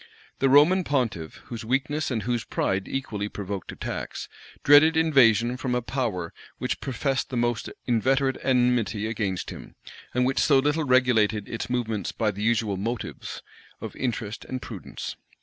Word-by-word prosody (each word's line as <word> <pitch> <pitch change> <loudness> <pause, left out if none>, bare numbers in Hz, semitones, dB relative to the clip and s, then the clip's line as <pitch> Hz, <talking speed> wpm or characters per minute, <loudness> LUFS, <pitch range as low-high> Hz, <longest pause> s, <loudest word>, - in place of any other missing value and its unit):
The 135 - +3
Roman 155 +7 +6
pontiff, 120 - -1
whose 115 -2 -7
weakness 140 +6 0
and 115 -5 -2
whose 120 0 -1
pride 95 0 -1
equally 105 -6 -3
provoked 100 -2 -5
attacks, - - -5 0.4
dreaded 150 +3 +7
invasion 125 -6 +4
from 125 -1 -1
a 125 - +1
power 115 -10 -2 0.2
which - - -3
professed 135 +1 -1
the 125 - -3
most 120 -1 0 0.2
inveterate 130 +3 +2
enmity 125 -4 +2
against 105 -4 -2
him, - - -10 0.4
and 125 0 +3
which 130 +1 +1
so 140 - +5
little 150 +3 +1
regulated 115 -5 +3
its 115 - -5
movements 115 -6 -1
by 110 -2 0
the 100 +1 -7
usual 110 -3 +1
motives 115 +4 -5 0.4
of - - -7
interest 115 -4 -3
and 130 - -5
prudence. 110 -6 -7
120 Hz, 150 wpm, -26 LUFS, 110-135 Hz, 0.4 s, dreaded